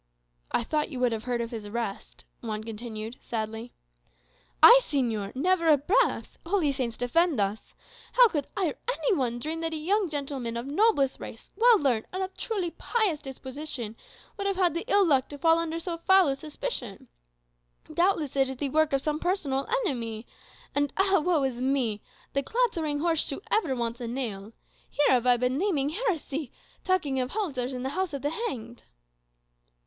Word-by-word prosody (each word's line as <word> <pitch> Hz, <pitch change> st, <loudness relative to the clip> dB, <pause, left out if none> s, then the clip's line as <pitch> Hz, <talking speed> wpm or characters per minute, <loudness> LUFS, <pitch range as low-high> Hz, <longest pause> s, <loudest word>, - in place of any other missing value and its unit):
"I -, -, +1 dB
thought 300 Hz, +5 st, -1 dB
you 260 Hz, -, -6 dB
would 250 Hz, -1 st, +2 dB
have 225 Hz, 0 st, -4 dB
heard 245 Hz, -1 st, -1 dB
of 230 Hz, -, -4 dB
his 220 Hz, -3 st, -6 dB
arrest," 220 Hz, -1 st, -5 dB, 0.2 s
Juan 215 Hz, -2 st, -4 dB
continued, 225 Hz, +1 st, -6 dB
sadly. 225 Hz, +1 st, -4 dB, 0.9 s
"I, 475 Hz, +9 st, +11 dB
señor! 235 Hz, -, -2 dB
Never 340 Hz, +4 st, +2 dB
a 305 Hz, -2 st, +7 dB
breath. 365 Hz, -, +1 dB
Holy 340 Hz, -4 st, +1 dB
Saints 255 Hz, -4 st, -3 dB
defend 305 Hz, +3 st, +2 dB
us! 200 Hz, +2 st, -2 dB, 0.4 s
How -, -, +8 dB
could 295 Hz, -9 st, -2 dB
I, 390 Hz, -, +2 dB
or -, -, -6 dB, 0.2 s
any -, -, 0 dB
one, 245 Hz, -5 st, -1 dB
dream 310 Hz, +7 st, -3 dB
that 325 Hz, 0 st, -2 dB
a -, -, -2 dB
young 380 Hz, +4 st, +1 dB
gentleman 275 Hz, -5 st, -3 dB
of 235 Hz, -, -4 dB
noblest 285 Hz, -, +2 dB
race, -, -, -10 dB
well 470 Hz, 0 st, +6 dB
learned, 245 Hz, -7 st, +1 dB
and 375 Hz, +1 st, -2 dB
of 375 Hz, -, -6 dB
truly 390 Hz, -7 st, -2 dB
pious 420 Hz, -9 st, 0 dB
disposition, 265 Hz, -4 st, -6 dB, 0.4 s
would 400 Hz, -1 st, -2 dB
have 395 Hz, -, 0 dB
had 365 Hz, -3 st, +2 dB
the 335 Hz, +4 st, -3 dB
ill 405 Hz, -4 st, +4 dB
luck 270 Hz, -6 st, +2 dB
to 290 Hz, -, -7 dB
fall 330 Hz, +2 st, +4 dB
under 330 Hz, 0 st, -2 dB
so 335 Hz, 0 st, -4 dB
foul 380 Hz, -2 st, +5 dB
a 270 Hz, -, 0 dB
suspicion? 275 Hz, -, -5 dB, 0.9 s
Doubtless 340 Hz, -6 st, +1 dB
it 270 Hz, -1 st, +3 dB
is 265 Hz, -, -4 dB
the 280 Hz, +1 st, -2 dB
work 315 Hz, 0 st, +2 dB
of 275 Hz, -, +1 dB
some 305 Hz, 0 st, -1 dB
personal 305 Hz, -7 st, -1 dB, 0.2 s
enemy. 230 Hz, -, -3 dB, 0.5 s
And 285 Hz, -1 st, +1 dB
ah, 385 Hz, 0 st, +4 dB
woe 335 Hz, -5 st, +2 dB
is 255 Hz, -2 st, -2 dB
me! 255 Hz, -6 st, 0 dB, 0.3 s
'the 275 Hz, -, +2 dB
clattering 325 Hz, -, 0 dB
horse 330 Hz, -2 st, +2 dB
shoe 275 Hz, -, -2 dB
ever 325 Hz, -12 st, +2 dB
wants 235 Hz, 0 st, -3 dB
a 240 Hz, -, -3 dB
nail' 225 Hz, -4 st, -4 dB, 0.4 s
here 295 Hz, -, +2 dB
have 250 Hz, -1 st, +3 dB
I 245 Hz, -1 st, +6 dB
been 250 Hz, +3 st, 0 dB
naming 320 Hz, -8 st, +1 dB
heresy, 320 Hz, -, -2 dB, 0.3 s
'talking 310 Hz, -8 st, +1 dB
of 250 Hz, 0 st, -1 dB
halters 275 Hz, -, -2 dB
in 250 Hz, -1 st, -5 dB
the 265 Hz, -, -1 dB
house 365 Hz, +2 st, -2 dB
of 280 Hz, -, -4 dB
the 290 Hz, -, 0 dB
hanged? 245 Hz, -, -5 dB
280 Hz, 185 wpm, -27 LUFS, 245-340 Hz, 0.9 s, I